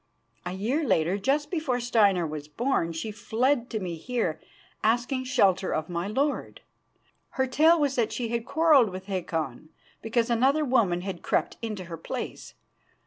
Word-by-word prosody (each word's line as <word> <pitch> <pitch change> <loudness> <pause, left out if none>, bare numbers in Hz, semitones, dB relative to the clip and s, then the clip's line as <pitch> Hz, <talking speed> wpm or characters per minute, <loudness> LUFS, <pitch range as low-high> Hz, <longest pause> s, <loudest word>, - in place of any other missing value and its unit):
A 180 - -3
year 235 +12 -1
later, 185 - +1
just 285 +8 0
before 310 -8 -1
Steinar 205 -7 +3
was 150 -1 -6
born, 195 - 0
she 165 +7 -4
fled 245 +4 0
to 220 - -2
me 175 -4 -4
here, 180 -5 -2 0.4
asking 245 +4 +1
shelter 195 -8 +2
of 155 +2 -3
my 175 +1 -2
lord. 275 +7 -2 0.8
Her 265 - +3
tale 315 +6 +4
was 280 -3 0
that 225 -3 +1
she 235 -2 -3
had 235 0 -1
quarrelled 300 -5 +4
with 185 0 -7
Hakon 160 -7 -3 0.3
because 230 +1 0
another 270 +6 +3
woman 220 -10 +2
had 185 -2 -5
crept - - -1
into 215 -5 -4
her 170 -1 -7
place. 165 - -6
225 Hz, 160 wpm, -27 LUFS, 180-260 Hz, 0.8 s, tale